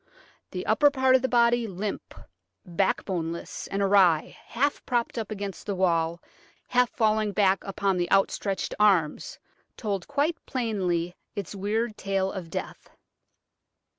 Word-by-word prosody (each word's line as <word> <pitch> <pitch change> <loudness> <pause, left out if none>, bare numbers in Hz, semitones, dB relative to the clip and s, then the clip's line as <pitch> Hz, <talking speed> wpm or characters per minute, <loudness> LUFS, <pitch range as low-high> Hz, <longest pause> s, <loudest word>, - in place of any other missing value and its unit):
The - - -5
upper 290 - +5
part 260 -2 +3
of 260 - +4
the 260 - 0
body, 235 -1 +3
limp, 200 +1 -5 0.5
backboneless, 170 -1 -2
and 200 +1 -1
awry, 190 -5 +4
half 280 +4 -1
propped 240 -2 0
up 225 -3 -4
against 200 -2 -6
the 200 - -1
wall, 170 -2 +1 0.5
half 250 -1 +3
falling 215 -2 +1
back 195 -1 +2
upon 195 -1 -1
the 175 -1 -1
outstretched 195 0 +1
arms, 190 -8 +2 0.4
told 200 -5 -3
quite 295 +4 -1
plainly 185 -8 -1 0.2
its 200 -3 -5
weird 215 +3 -2
tale 195 -1 -1
of 180 -4 -7
death. - - -6
200 Hz, 135 wpm, -26 LUFS, 185-235 Hz, 0.5 s, upper